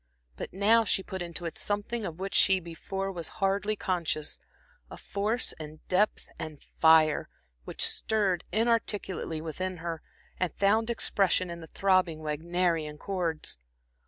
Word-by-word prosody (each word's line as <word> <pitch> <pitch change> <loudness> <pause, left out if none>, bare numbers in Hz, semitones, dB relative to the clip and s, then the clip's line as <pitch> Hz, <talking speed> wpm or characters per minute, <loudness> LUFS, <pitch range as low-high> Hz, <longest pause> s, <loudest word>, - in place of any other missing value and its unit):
But - - -6
now 215 +4 +4
she 195 -3 +2
put 190 -1 -6
into 170 0 -5
it 165 - -4
something 205 +2 -1
of 160 - -7
which 195 +1 -4
she 190 -1 +5
before 195 +3 -4
was 170 -4 -4
hardly 200 +2 +1
conscious, 170 -6 -2 0.5
a - - -9
force 215 +5 -1
and 155 0 -10
depth 200 +4 +2
and 155 -2 -6 0.2
fire, 160 -1 +5 0.4
which - - +2
stirred 200 -5 +1
inarticulately 210 -7 0
within 185 +3 -4
her, 165 -1 -4 0.4
and 185 -3 +1
found 220 +3 +3
expression 190 -5 +1
in 170 - -6
the 165 - -10
throbbing 185 -4 +2
Wagnerian 160 0 -1
chords. 170 - -3
185 Hz, 140 wpm, -29 LUFS, 165-200 Hz, 0.5 s, she